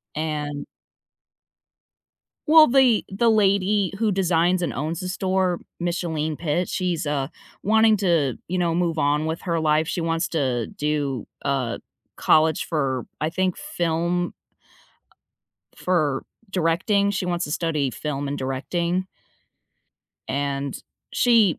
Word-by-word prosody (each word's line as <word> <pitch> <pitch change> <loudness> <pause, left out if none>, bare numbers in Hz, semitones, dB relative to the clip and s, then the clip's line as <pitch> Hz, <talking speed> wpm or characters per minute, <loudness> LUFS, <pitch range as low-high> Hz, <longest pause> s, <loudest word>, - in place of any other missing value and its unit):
and 150 -2 -3 1.8
Well, 310 0 +8
the 255 -4 +4
the 225 +4 +2
lady 200 -2 +2
who 220 -2 +2
designs 180 -1 +2
and - - -1
owns 155 +4 -3
the 185 - -4
store, 185 -1 0 0.2
Micheline 165 -3 -2
Pitt, 170 +3 -1
she's, 175 -5 -1
uh, 140 -2 -1 0.3
wanting 220 +1 +4
to, 165 - +2
you 185 - -1
know, 170 -2 +1
move 170 -2 0
on 145 +2 +1
with 160 +1 -3
her 170 -3 -1
life, 155 0 +2
she 175 - -2
wants 165 0 0
to 130 -8 0
do, 145 -5 -2 0.2
uh, 130 -4 -1 0.4
college 155 0 +3
for, 135 -6 -1
I 155 - 0
think, 185 +1 0
film 175 - -1 1.4
for 155 -7 0 0.3
directing. 190 +3 +2
She 195 -2 -2
wants 175 0 -1
to - - -7
study 150 -4 0
film 145 +1 -4
and 145 - -2
directing 170 +8 -2 1.2
and 140 0 -2 0.3
she 225 -8 +4
165 Hz, 125 wpm, -23 LUFS, 150-185 Hz, 1.8 s, Well